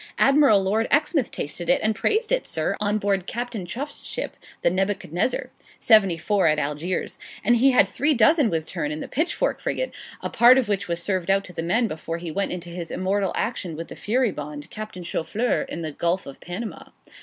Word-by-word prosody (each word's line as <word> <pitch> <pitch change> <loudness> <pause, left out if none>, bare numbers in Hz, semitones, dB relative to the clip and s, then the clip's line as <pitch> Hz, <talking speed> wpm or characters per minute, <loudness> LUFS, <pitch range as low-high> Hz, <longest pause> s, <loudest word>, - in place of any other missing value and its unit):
'Admiral 275 -8 +5
Lord 215 +4 +1
Exmouth 295 -3 +2
tasted 170 +4 -5
and 215 0 +3
praised 435 - 0
it, - - +2
sir, - - -1
on 210 0 +1
board 195 -3 0
Captain 235 -6 -4
Chuff's 285 - -5
ship, - - -4 0.3
the - - +4
"Nebuchadnezzar," 190 +2 -1 0.3
74, 195 -3 +4
at 155 -1 +3
Algiers; 150 +5 -2 0.2
and 240 +3 +4
he 265 +4 +5
had 255 - +5
three 295 +2 +1
dozen 265 +3 +4
with 160 -3 -1
turn 155 -4 -3
in 155 - -4
the - - -5
"Pitchfork" 315 +6 -1
frigate, - - -2 0.3
a - - -3
part 245 +2 +7
of 260 -4 +2
which 200 -3 -1
was 170 0 -2
served 185 -1 -1
out 195 0 +3
to 180 - -10
the 165 - -3
men 220 +8 +1
before 165 -2 -5
he 170 -1 -6
went 200 +5 -1
into 175 -1 -5
his 170 -1 -6
immortal 195 0 0
action 185 -8 -2
with 165 +2 -7
the - - -8
"Furibonde," 150 - -2
Captain 215 -4 -7
Choufleur, 205 +9 -1
in 170 - -5
the 155 - -3
Gulf 170 +5 -1
of 140 - -10
Panama.' 190 +6 -7
195 Hz, 195 wpm, -24 LUFS, 170-235 Hz, 0.3 s, part